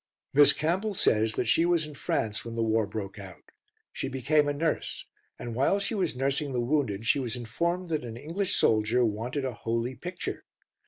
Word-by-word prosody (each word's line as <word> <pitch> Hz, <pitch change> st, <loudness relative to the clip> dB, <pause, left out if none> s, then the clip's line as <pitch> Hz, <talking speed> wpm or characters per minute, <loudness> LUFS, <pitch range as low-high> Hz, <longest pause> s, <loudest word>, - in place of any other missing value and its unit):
Miss 145 Hz, +1 st, +8 dB
Campbell 190 Hz, +7 st, -1 dB
says 110 Hz, -8 st, +2 dB
that -, -, 0 dB
she 120 Hz, +9 st, +3 dB
was 170 Hz, -2 st, +2 dB
in 150 Hz, -, -9 dB
France 110 Hz, -5 st, -2 dB
when 115 Hz, -1 st, -7 dB
the 115 Hz, -, 0 dB
war 110 Hz, -1 st, +2 dB
broke 100 Hz, -1 st, -6 dB
out. 95 Hz, -3 st, -12 dB, 0.4 s
She -, -, -3 dB
became 140 Hz, +3 st, +2 dB
a -, -, +2 dB
nurse, 155 Hz, +2 st, -2 dB, 0.3 s
and 120 Hz, -1 st, -6 dB
while 135 Hz, -, +2 dB
she 200 Hz, -, -1 dB
was 185 Hz, -9 st, 0 dB
nursing 140 Hz, +2 st, 0 dB
the 125 Hz, -, 0 dB
wounded 120 Hz, -5 st, 0 dB
she 140 Hz, -, +3 dB
was 120 Hz, -4 st, -3 dB
informed 170 Hz, +10 st, -2 dB
that 155 Hz, -4 st, -1 dB
an 115 Hz, -1 st, -7 dB
English 165 Hz, +9 st, -2 dB
soldier 110 Hz, +3 st, +3 dB
wanted 120 Hz, +6 st, -2 dB
a 130 Hz, -, -2 dB
"holy 115 Hz, +2 st, -2 dB
picture." 175 Hz, +8 st, -5 dB
130 Hz, 195 wpm, -28 LUFS, 115-155 Hz, 0.4 s, Miss